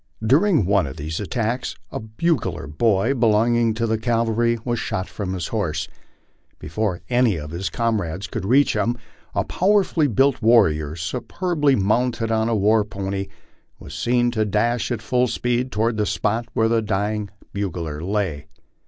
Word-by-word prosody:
During 150 - +4
one 95 -4 +2
of 65 - -8
these 80 +3 -4
attacks 115 +4 -2 0.2
a - - -4
bugler 110 - -1
boy 100 - +1
belonging 115 -1 +2
to 115 +1 0
the 110 -1 0
cavalry 115 0 +1
was 120 -2 -1
shot 95 -4 -3
from 95 -3 -4
his 90 -3 -4
horse; 85 -8 -2 0.7
before 90 +3 -3
any 120 -4 +3
of 75 -1 -6
his 90 +3 -3
comrades 105 -6 -1
could 115 -4 -5
reach 130 +8 +3
him, 120 +1 0 0.4
a - - +2
power 200 +2 +2
fully 160 -5 +1
built 135 +2 +2
warrior, 80 -10 +3
superbly 140 - 0
mounted 115 +2 +1
on 110 0 +1
a 115 - +1
war 105 +1 +3
pony, 100 -1 -4 0.5
was 70 - -11
seen 120 +8 +1
to 110 -2 0
dash 110 +3 0
at 115 -3 -3
full 125 +2 +2
speed 125 +2 -1
toward 110 +2 0
the 105 -1 +1
spot 115 +3 -1
where 110 - +2
the 115 0 +2
dying 105 0 -1 0.2
bugler 85 -6 -3
lay. 90 -7 -2
110 Hz, 160 wpm, -22 LUFS, 95-120 Hz, 0.7 s, During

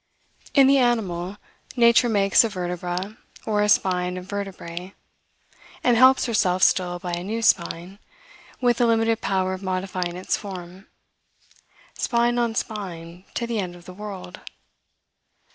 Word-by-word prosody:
In 275 -2 +7
the 275 +1 +5
animal, 200 -6 0 0.4
nature 235 0 +5
makes 200 -1 +4
a 230 - 0
vertebra, 180 +1 -4 0.3
or 210 -1 +1
a 210 - +2
spine 180 -2 +2
of 180 - -7
vertebrae, 190 -2 -6 0.9
and 245 -1 +4
helps 260 +3 +6
herself 185 -6 +1
still 180 -1 +3
by 175 0 -6
a 175 +1 -3
new 225 +4 -3
spine, 180 0 0 0.6
with 245 -1 +2
a 240 - +4
limited 225 0 +2
power 190 -1 0
of 185 - -6
modifying 185 -2 -3
its 185 - -1
form, 185 -1 -9 1.1
spine 240 0 +1
on 235 -2 0
spine, 180 -5 -5
to 235 - -1
the 235 -2 -2
end 180 -3 -4
of 175 -1 -15
the 185 - -10
world. 190 -2 -8
195 Hz, 145 wpm, -23 LUFS, 180-225 Hz, 1.1 s, In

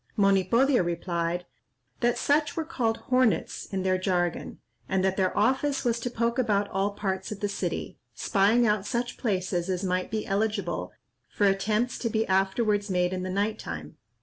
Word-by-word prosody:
Monipodio 200 +5 +4
replied, 170 0 -2 0.5
that 240 0 +2
such 295 +2 +1
were 325 - -1
called 230 -8 -1
"Hornets" 255 -3 +2
in 190 -1 -3
their 185 0 +1
jargon, 175 -2 -1 0.3
and 190 -1 +1
that 190 0 +1
their 190 -2 0
office 265 +6 +1
was 235 -1 +1
to 245 - -3
poke 235 +1 -1
about 205 -5 +2
all 195 +1 +1
parts 190 -1 -3
of 210 - -5
the 205 - 0
city, 200 - -4 0.2
spying 215 +4 +3
out 210 -3 +2
such 245 0 -2
places 185 -5 -1
as 185 0 -1
might 185 -1 -1
be 215 -1 -2
eligible 200 - -1 0.4
for 205 - +1
attempts 210 +5 +1
to 230 - -1
be 220 0 +1
afterwards 200 +2 +1
made 180 -1 +1
in 185 - -2
the 185 - -3
night 205 +3 -1
time. 80 -2 -7
200 Hz, 175 wpm, -27 LUFS, 185-230 Hz, 0.5 s, Monipodio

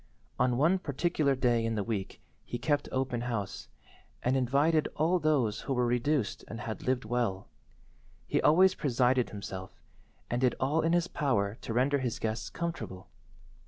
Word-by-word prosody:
On 125 -1 +2
one 165 +8 +3
particular 150 -2 0
day 120 -3 +2
in 115 0 -1
the 105 - -1
week 100 -3 -4 0.2
he 120 - -5
kept 145 +4 0
open 130 -2 -1
house, 115 -5 -4 0.6
and 125 +2 +2
invited 140 +5 +2
only 170 +3 +2
those 140 -9 +1
who 135 - -2
were 125 0 +2
reduced 125 +1 0
and 115 - -7
had 110 -1 -5
lived 125 -3 0
well. 110 -5 -1 0.8
He - - 0
always 185 +5 +6
presided 125 -5 +1
himself, 95 -2 -7 0.5
and 120 +1 -1
did 130 -1 +3
all 145 +5 +2
in 165 +1 +1
his 175 0 +2
power 105 - 0
to - - -5
render 135 +5 +2
his 125 -2 -2
guests 110 -1 -3
comfortable. 95 - -5
125 Hz, 160 wpm, -30 LUFS, 115-150 Hz, 0.8 s, always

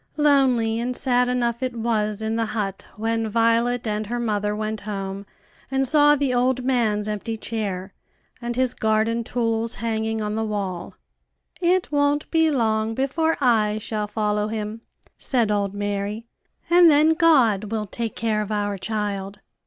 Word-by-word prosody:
Lonely 260 -6 +3
and 250 +1 -2
sad 250 -1 +2
enough 240 -1 0
it 255 -2 -2
was 220 -2 -1
in 220 +1 -1
the 225 -1 0
hut 195 -2 -3
when 225 +1 -1
Violet 230 +2 +2
and 210 -1 -2
her 240 +2 -2
mother 210 -3 -1
went 215 0 -3
home 195 -1 -5 0.4
and 270 0 +1
saw 295 +1 +5
the 280 -3 0
old 255 +1 +1
man's 220 -5 +1
empty 215 +2 -3
chair, 200 -4 -4 0.5
and 240 0 -3
his 255 0 +1
garden 220 +2 +1
tools 230 0 -1
hanging 220 -1 -2
on 210 -1 -2
the 220 +1 -1
wall. 200 -5 -4 0.7
"It 360 0 +2
won't 290 0 +1
be 320 -1 +3
long 225 -5 0
before 320 +5 0
I 220 -5 +2
shall 215 -1 -3
follow 210 0 -1
him," 215 0 -4 0.4
said 235 -5 +1
old 200 -1 -1
Mary, 205 +2 -3 0.4
"and 345 0 +7
then 305 +2 +5
God 265 - +4
will 215 0 -3
take 225 +3 -5
care 215 -1 0
of 210 0 -5
our 205 -2 -1
child." 205 -2 -3
225 Hz, 160 wpm, -23 LUFS, 210-250 Hz, 0.7 s, and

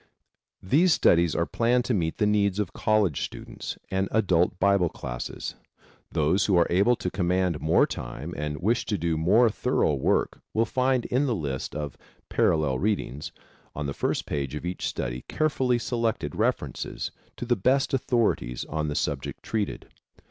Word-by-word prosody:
These 160 - +4
studies 85 - +4
are 85 - +1
planned 120 - +1
to 125 - 0
meet 80 -6 -1
the 105 - +2
needs 100 -2 +2
of 105 -4 -2
college 105 -8 +1
students - - -6
and 95 0 0
adult 90 -5 +2
Bible 100 -3 +3
classes. - - -5 0.6
Those 80 +6 +2
who 95 -3 +4
are 85 - +5
able 100 +8 +4
to 90 - -4
command 90 -3 0
more 80 +2 +4
time 75 +7 -6
and 75 0 -3
wish 115 +6 +1
to 105 - 0
do 85 -2 0
more 105 +9 +4
thorough 120 - +1
work 70 - 0
will 115 +1 +3
find 130 +2 +1
in 135 +4 +1
the 120 - +1
list 70 -7 -4
of 75 -2 -4 0.3
Parallel 75 -5 +2
Readings 90 - -2 0.4
on 75 - -3
the 70 - -2
first - - -1
page 70 -1 -3
of 75 - -5
each 90 +1 -3
study - - -4
carefully 130 -5 +1
selected 115 -2 -1
references - - -2 0.3
to - - -4
the 120 0 +2
best 130 +7 +2
authorities 115 - 0
on 75 0 -2
the 75 - -3
subject 70 -4 -3
treated. 105 -3 -3
95 Hz, 165 wpm, -26 LUFS, 75-115 Hz, 0.6 s, are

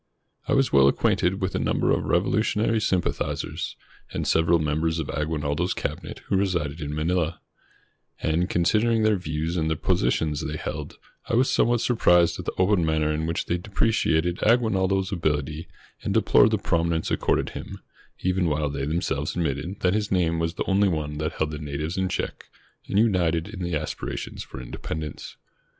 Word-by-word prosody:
I 140 - +1
was 135 -1 +2
well 70 -1 +7
acquainted 90 +7 +1
with 95 - -1
a - - 0
number - - +1
of - - +1
revolutionary 110 +4 +1
sympathizers, 95 -4 -1 0.4
and - - -3
several 80 +1 +4
members 80 +1 0
of 80 -3 -3
Aguinaldo's 75 +2 -1
cabinet - - -5
who 95 - +1
resided 85 -6 -1
in 75 0 -4
Manila, 85 +1 0 0.8
and, 85 +3 0
considering 110 +6 +2
their 110 -1 +4
views 80 -1 -3
and 80 -1 0
the 80 - +1
positions 75 +3 0
they 75 0 -3
held, - - -5 0.3
I - - +1
was 130 +3 +3
somewhat 120 -1 +3
sur 125 - +1
prised 85 -5 +4
at - - -6
the - - -1
open 95 -1 +3
manner 80 -1 +1
in 80 +1 -2
which 85 - -1
they 85 - -1
depreciated 90 -4 +1
Aguinaldo's 95 -5 +2
ability 80 -2 -1 0.3
and - - -2
deplored - - +5
the - - +1
prominence 85 -1 0
ac - - +2
corded - - +1
him, - - -7 0.4
even 95 -1 +1
while 75 -2 0
they 70 -1 -3
themselves 75 -2 -1
admitted 85 +3 -2
that 90 0 +3
his 105 -1 -1
name 85 -3 +2
was 85 +1 -1
the - - -2
only 100 +1 +3
one 75 -3 -3
that 75 +1 -2
held 80 -1 -1
the 75 - -5
natives 75 +2 -4
in 95 -1 0
check - - -4 0.4
and - - -1
united 90 -6 +2
in 105 -3 -8
the 85 -2 -1
aspirations 75 0 -4
for 65 - -8
independence. 75 +4 -6
85 Hz, 175 wpm, -25 LUFS, 75-95 Hz, 0.8 s, well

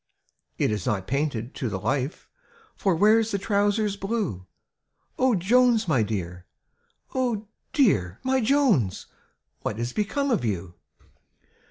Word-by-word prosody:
It - - +1
is 105 +4 -3
not 100 -5 0
painted 135 -4 -2
to 125 - -3
the 95 -2 -3
life, 130 - -2 0.5
For 190 -3 +1
Where's 215 +5 +4
the 200 - 0
trousers 205 0 +1
blue? 195 - -3 0.7
O 255 -3 +4
Jones, 230 +3 +3
my 140 -8 +3
dear! 90 -4 -4 0.3
— - - -33
Oh, 240 -5 -1 0.2
dearl 110 - +2
my 260 0 +2
Jones, 225 - +2 0.5
What 105 - -4
is 120 +1 -3
become 270 +7 -1
of 225 - +1
you?" 95 -6 -3
190 Hz, 135 wpm, -25 LUFS, -, 0.7 s, Where's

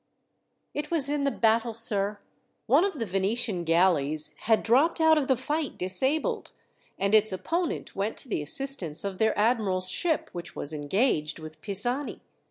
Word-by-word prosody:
"It 295 +1 -4
was 290 -4 +2
in 290 -1 0
the - - +3
battle, 230 -2 +1
sir. 210 -3 +1 0.5
One 280 +8 +4
of 390 -5 -2
the 230 - -2
Venetian 195 0 -1
galleys 160 -3 +1
had 220 -1 +3
dropped 280 +10 +3
out 320 0 +5
of 295 -4 0
the 265 - +3
fight 295 +4 -3
disabled, 260 - 0 0.5
and 200 +2 0
its 215 -1 +5
opponent 330 - -3
went 200 +3 -2
to - - -7
the 210 - -2
assistance 190 - -1
of 195 -2 -5
their 220 0 +2
admiral's 205 -5 +1
ship, 330 - -1
which 175 -1 -8
was 145 - -5
engaged 155 - 0
with 155 -1 -11
Pisani. 240 +8 +1
220 Hz, 165 wpm, -27 LUFS, 185-275 Hz, 0.5 s, out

